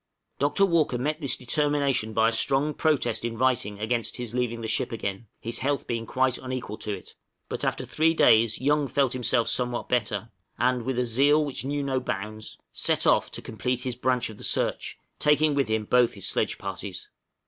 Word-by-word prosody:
Dr. 145 +8 +3
Walker 165 -8 +2
met 150 +6 -2
this 140 -4 +1
determination 140 -3 0
by 110 +1 +3
a - - -2
strong 135 +5 +2
protest 155 -5 +1
in 115 -1 -3
writing 120 -5 +1
against 115 +2 -1
his 120 -2 -5
leaving 120 -2 -1
the 115 - -4
ship 110 - 0
again, 100 -1 -4
his 115 +1 -4
health 140 0 -1
being 115 -1 -3
quite 130 +1 +1
unequal 130 -5 -5
to 105 - -4
it; 100 -3 -7 0.4
but - - -3
after - - -1
three 160 +1 +2
days 110 -6 +4
Young 145 +1 +2
felt 135 0 +1
himself 125 -2 +1
somewhat 125 -1 -1
better, 110 -3 -1 0.3
and, 125 0 +1
with 130 -1 -2
a 125 - +1
zeal 140 +6 +3
which 140 -3 -4
knew 145 +1 -1
no 135 -1 0
bounds, 110 -2 -5
set - - +1
off - - +3
to - - -7
complete 125 +3 -2
his 125 -1 -3
branch 125 -2 0
of 105 - -13
the - - -9
search, - - -1 0.2
taking 150 0 +3
with 140 -3 +1
him 110 -1 -1
both 125 0 +3
his 100 - -4
sledge - - 0
parties. - - -6
125 Hz, 195 wpm, -26 LUFS, 115-140 Hz, 0.4 s, days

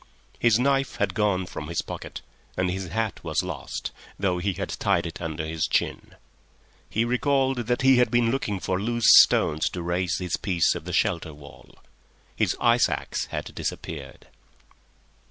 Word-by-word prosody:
His 115 -2 +4
knife 135 +2 +1
had 100 -2 -1
gone 100 -3 +1
from 75 -3 -7
his 85 +1 -2
pocket - - -7 0.4
and 90 -1 +1
his 95 0 -4
hat 110 +4 -3
was 80 +1 -1
lost, 90 -7 -5 0.3
though 95 -2 0
he 95 +2 -1
had - - -4
tied - - 0
it 85 0 -7
under 80 -1 -4
his 80 0 -1
chin. - - -2 0.7
He 115 +2 0
recalled 130 -1 +1
that 125 +1 0
he 135 -1 +6
had 125 - +4
been 120 -1 +2
looking 105 -7 -2
for 95 +1 -2
loose 120 +1 -1 0.2
stones 75 +1 +2
to 90 - -6
raise 85 0 -1
his 90 -2 -2
piece 90 -6 +1
of - - -7
the - - -5
shelter 80 -2 0
wall. 70 -1 -15 0.6
His - - 0
ice 120 0 +4
axe - - -3
had - - -6
disappeared. - - -6
95 Hz, 170 wpm, -25 LUFS, 85-120 Hz, 0.7 s, he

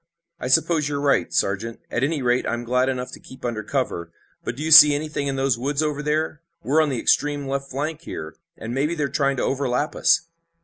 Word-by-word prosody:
"I - - -4
suppose 150 +3 +2
you're 145 -1 -2
right, 140 -1 +1
Sergeant. 105 +4 -1
At 120 - -1
any 145 -1 -1
rate 125 0 +1
I'm 120 0 -2
glad 125 +2 +1
enough 125 -1 -4
to - - -10
keep 130 - -12
under 115 -3 -2
cover, 105 - -3 0.3
but - - -4
do 145 - -6
you 160 - -2
see 150 -1 +10
anything 145 -1 -3
in 135 - -1
those 135 -3 0
woods 140 +4 -1
over 150 -1 -2
there? 150 +1 -1 0.2
We're 145 +8 +3
on 155 - +1
the 130 -4 -2
extreme 145 +1 +1
left 135 0 -3
flank 150 +4 -4
here, 80 - -7 0.2
and 115 +2 -6
maybe 145 +6 0
they're 150 -3 -1
trying 140 -4 0
to - - -1
overlap 135 +2 -1
us." - - +3
140 Hz, 220 wpm, -23 LUFS, 125-150 Hz, 0.3 s, see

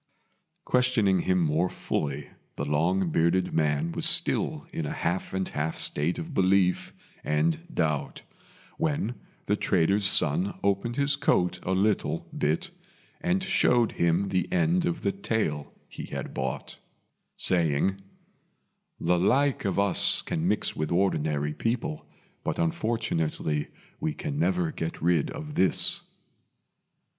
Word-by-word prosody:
Questioning 120 -7 +2
him 90 +1 +1
more 80 +2 +1
fully, 70 -3 -3 0.3
the 70 - -3
long 85 +5 +1
bearded 85 +3 +1
man 75 +1 +1
was - - +2
still - - +2
in 80 - -3
a - - -4
half 90 +2 -2
and 95 -1 -2
half 75 +2 -3
state 75 +4 +2
of 165 -2 -6
belief 95 -3 +2 0.3
and 75 +2 +1
doubt, 75 -3 -2 0.6
when 145 -7 -1 0.3
the 105 - +1
trader's 100 +1 +2
son 90 +3 +3
opened 100 +4 0
his 140 +1 +1
coat 90 0 +1
a 95 - -2
little 100 +2 0
bit, 75 +2 -1 0.5
and 185 +2 0
showed 125 - +2
him 85 +3 +1
the 95 - -1
end 175 0 +2
of 170 -2 -3
the - - +1
tail 110 - -2 0.2
he - - -8
had - - -6
bought, 65 -1 -4 0.6
saying, 90 +2 +1 1.0
"The 90 +1 +1
like 130 +7 +2
of 95 - -1
us 100 -1 +3
can 80 +2 -2
mix 105 +2 0
with 75 +2 -3
ordinary 75 -5 0
people, 125 - -3 0.4
but - - -2
unfortunately 80 -5 -1 0.3
we 155 0 -2
can 150 -3 -4
never 175 -1 +1
get 80 - -5
rid 85 -2 +1
of 150 -1 -7
this." 95 -9 +4
95 Hz, 130 wpm, -27 LUFS, 80-120 Hz, 1.0 s, this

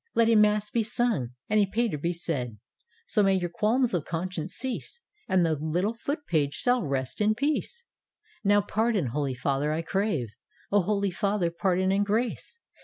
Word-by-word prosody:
Let 230 -1 +4
a 230 - +5
mass 210 0 +3
be 235 - +2
sung, 215 - -1
and 215 0 +3
a 200 - +3
pater 215 -6 -1
be 170 +4 0
said: 140 -10 -3 0.5
So 215 - +2
may 195 -1 +4
your 175 -2 -1
qualms 230 +6 +1
of 175 -5 0
conscience 170 0 -4
cease, 260 - -5 0.3
And 185 -4 +3
the 160 - +2
little 160 +8 -1
Foot 285 +5 -4
page 145 -4 +1
shall 245 0 +2
rest 135 +1 -2
in 215 +1 +3
peace! 310 - -2 0.2
" - - -65
" - - -30
Now 205 0 +4
pardon, 210 - 0
Holy 140 -3 -1
Father, 140 +3 0
I 160 +2 -1
crave. 190 - -1 0.4
Holy 200 0 +2
Father, 195 -1 0
pardon 185 +1 +1
and 200 +1 +2
grace! 230 - -2
195 Hz, 180 wpm, -27 LUFS, 160-220 Hz, 0.5 s, a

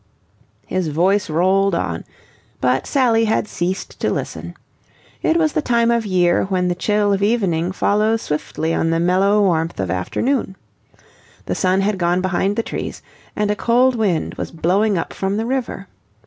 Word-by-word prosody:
His 185 -3 -2
voice 180 +6 +1
rolled 190 +4 +2
on, 85 - -3 0.5
but 130 +1 +1
Sally 235 -5 +3
had 215 -1 0
ceased 185 +1 -4
to - - 0
listen. - - -4 0.7
It 325 - +2
was 315 -3 +1
the - - +1
time 235 -3 +2
of 230 -2 0
year 180 -2 +2
when 185 -2 0
the - - +1
chill 205 +3 +1
of 195 - -1
evening 190 -6 +1
follows 215 +3 +1
swiftly 155 +2 -2
on 165 - 0
the 165 0 +1
mellow 190 +4 +3
warmth 165 - 0
of 95 -3 -1
afternoon. 195 - -1 0.9
The - - -2
sun 185 0 +1
had 200 -1 0
gone 175 +1 +2
behind 190 +2 0
the 230 - -1
trees, - - -6 0.3
and 210 -1 0
a - - 0
cold 245 +4 +3
wind 205 -8 0
was - - -3
blowing 190 +5 +1
up 165 - -3
from 195 +1 -2
the 225 - -1
river. 245 -6 -3
195 Hz, 170 wpm, -19 LUFS, 175-220 Hz, 0.9 s, Sally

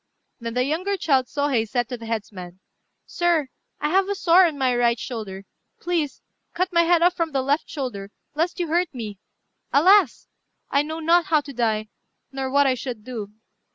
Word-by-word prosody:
Then 230 -1 -5
the 250 - +2
younger 360 +8 -1
child 270 -7 +2
Sôhei 275 -7 0
said 245 0 0
to 250 - -3
the 230 -1 -10
headsman, 190 -5 -5 0.5
"Sir, 340 -5 0 0.3
I 300 - 0
have 385 +3 +2
a 405 - 0
sore 365 -1 +5
on 310 -3 -5
my 260 -2 +1
right 240 -1 +2
shoulder: 210 -6 -6 0.3
please, 330 -6 -2 0.3
cut 365 +1 -1
my 340 - +5
head 340 0 +4
off 355 0 +5
from 330 -3 -2
the 265 -1 +1
left 285 +4 0
shoulder, 245 -9 -5 0.2
lest 330 +5 -1
you 350 - 0
should 315 - -8
hurt 345 -3 +1
me. 210 -5 -6 0.5
Alas! 360 - +4 0.4
I 280 - +4
know 315 +2 -5
not 335 +2 +4
how 310 -2 +3
to 280 -1 -10
die, 220 -3 -1 0.4
nor 270 -1 -3
what 280 +1 +4
I 265 - +3
should 245 -3 -6
do." 220 -4 -6
280 Hz, 190 wpm, -23 LUFS, 235-335 Hz, 0.5 s, sore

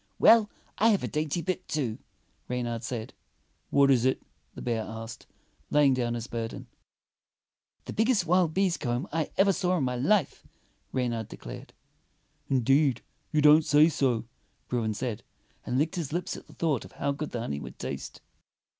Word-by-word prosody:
"Well, 225 -2 +6 0.3
I 220 - +5
have 205 -3 +2
a - - -1
dainty 155 +2 -2
bit, 185 0 -3
too," 130 -8 -2 0.5
Reynard 120 -2 -2
said. 120 -2 -5 0.6
"What 140 -1 +5
is 125 -3 +4
it.^ 130 0 +2 0.2
" - - -41
the - - -8
bear 115 -2 0
asked, 115 +1 -8 0.4
laying 145 -2 +4
down 120 -2 -1
his 115 -1 -4
burden. 115 -1 -5 1.2
"The - - -6
biggest 220 -4 +2
wild 175 -1 +3
bees' 185 0 +1
comb 120 +7 -2
I 160 -1 0
ever 195 0 +5
saw 180 +1 +1
in 150 - 0
my 125 -1 -1
life," 155 +6 +1 0.5
Reynard 120 -4 -1
declared. - - -10 0.8
"Indeed, 135 0 +3 0.3
you 155 -2 +2
don't 150 +2 +7
say 150 +2 +5
so," 130 -7 0 0.4
Bruin 110 -3 -1
said, 120 -2 -3 0.5
and 125 - 0
licked 160 +6 0
his 160 -5 -3
lips 175 +2 -2
at - - -11
thought 155 -7 -1
of - - -13
how 140 - -1
good 150 +2 -4
the 120 - -4
honey 70 -11 -3
would - - -9
taste. - - -6
140 Hz, 170 wpm, -28 LUFS, 120-165 Hz, 1.2 s, don't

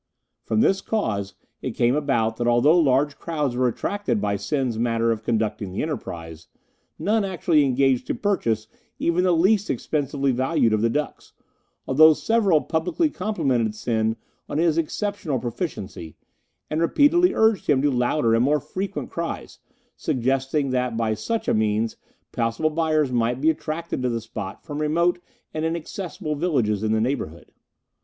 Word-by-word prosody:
From 220 - 0
this 195 -4 +3
cause 100 - -2 0.3
it - - -4
came 120 +2 +2
about 115 -7 0
that 120 - -1
although 120 +7 +5
large 140 -1 +2
crowds 150 -7 -2
were 125 0 +2
attracted 200 - -1
by 100 0 0
Sen's 115 +3 -2
manner 115 -1 +1
of 110 -2 -2
conducting 110 -3 -1
the 95 - -2
enterprise, 80 - -6 0.5
none 215 +1 +1
actually 175 -5 +2
engaged 135 -1 +2
to - - -1
purchase 115 - 0 0.3
even 170 +2 +1
the 185 - +3
least 195 +5 +3
expensively 140 +1 -1
valued 130 -2 +1
of 110 - +1
the 115 - +3
ducks, 150 +5 -4 0.5
although 155 +4 +7
several 200 -4 +2
publicly 180 - 0
complimented 135 - -1
Sen 110 0 0 0.3
on 145 - -2
his 165 -1 +3
exceptional 165 -2 -2
proficiency, 115 - -5 0.5
and 155 +2 -2
repeatedly 300 - +4
urged 220 -5 +3
him 145 -3 +4
to 145 - +3
louder 120 -1 +1
and 115 +1 +3
more 150 +3 +3
frequent 195 +7 -5
cries, 170 0 -5 0.4
suggesting 135 +2 0
that 125 -2 -1
by 115 -1 +1
such 220 - -3
means 110 +1 +1 0.4
possible 115 +7 0
buyers 155 -3 +1
might 120 +1 0
be 155 +3 +4
attracted 155 -1 -4
to 125 - 0
the 115 -1 -1
spot 100 -3 -7
from 150 -1 -5
remote 170 +4 +1 0.3
and 155 - -3
inaccessible 170 +1 -4
villages 135 - 0
in 110 0 0
the 110 - +2
neighbourhood. 110 - -3
140 Hz, 155 wpm, -23 LUFS, 115-165 Hz, 0.5 s, although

